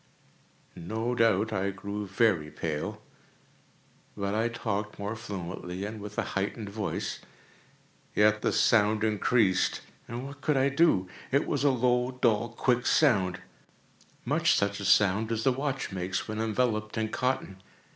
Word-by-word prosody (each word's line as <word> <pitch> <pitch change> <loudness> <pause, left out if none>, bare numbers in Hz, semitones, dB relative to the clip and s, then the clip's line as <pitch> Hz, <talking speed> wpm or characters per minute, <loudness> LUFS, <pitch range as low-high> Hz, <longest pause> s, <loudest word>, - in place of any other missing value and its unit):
No 110 +8 -3
doubt 110 -2 +2
I 95 -1 0
now 100 - -3
grew 100 +1 -5
very 95 -6 +2
pale;—but 80 +5 -8
I 110 +2 +1
talked 105 -3 -3
more 100 +2 -4
fluently, 95 -3 -6
and 105 0 -6
with 105 0 -8
a - - +1
heightened 100 +2 -2
voice. 100 0 -3 1.0
Yet 105 0 +4
the - - +1
sound 110 -1 +3
increased—and 110 +2 0
what 140 +1 -10
could 150 -3 +1
I 135 +1 +3
do? 140 - +3 0.2
It 140 +2 +2
was 145 -1 -1
a 145 - +5
low, 125 0 +1
dull, 115 -1 +2
quick 125 +1 0
sound—much 95 - 0
such 100 0 0
a 100 - -5
sound 105 +3 +3
as 115 -1 -1
a 135 - +5
watch 135 -1 -2
makes 95 0 -3
when 110 0 -4
enveloped 110 -1 -1
in 110 -1 0
cotton. 120 -7 -2
110 Hz, 140 wpm, -28 LUFS, 100-120 Hz, 1.0 s, a